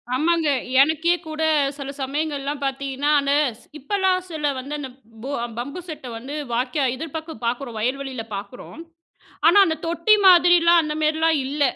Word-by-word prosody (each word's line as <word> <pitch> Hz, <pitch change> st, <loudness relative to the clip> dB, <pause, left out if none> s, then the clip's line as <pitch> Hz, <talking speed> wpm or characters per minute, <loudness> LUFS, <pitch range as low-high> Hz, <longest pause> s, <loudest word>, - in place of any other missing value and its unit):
ஆமாங்க. 325 Hz, +2 st, +1 dB, 0.3 s
எனக்கே 320 Hz, +4 st, +2 dB
கூட 310 Hz, 0 st, -6 dB, 0.4 s
சில 275 Hz, -1 st, -6 dB
சமயங்கள்லாம் 285 Hz, 0 st, -3 dB
பாத்தீங்கன்னா, 275 Hz, +1 st, -2 dB
அந்த 280 Hz, 0 st, 0 dB, 0.3 s
ஸ் -, -, -21 dB
இப்பல்லாம் 380 Hz, +3 st, 0 dB
சிலர் 295 Hz, -4 st, -2 dB
வந்து, 280 Hz, +3 st, -7 dB
அந்த 270 Hz, -2 st, -6 dB, 0.3 s
போ 275 Hz, -, -5 dB, 0.3 s
பம்பு 280 Hz, +8 st, -5 dB
செட்ட 300 Hz, -4 st, -7 dB
வந்து 265 Hz, +6 st, -7 dB, 0.2 s
வாய்க்கா 265 Hz, +4 st, 0 dB
எதிர்பக்கம் 320 Hz, -1 st, -7 dB
பாக்குறோம், 240 Hz, -1 st, -3 dB
வயல்வெளியில 260 Hz, 0 st, -3 dB
பாக்குறோம். 205 Hz, +9 st, -9 dB, 0.7 s
ஆனா 345 Hz, +5 st, +6 dB
அந்தத் 320 Hz, -1 st, -3 dB
தொட்டி 340 Hz, +6 st, +3 dB
மாதிரில்லாம், 345 Hz, -1 st, +6 dB
அந்த 300 Hz, -, -3 dB
மேரில்லாம் 315 Hz, +1 st, +2 dB
இல்ல. 285 Hz, +2 st, -2 dB
295 Hz, 145 wpm, -22 LUFS, 270-325 Hz, 0.7 s, ஆனா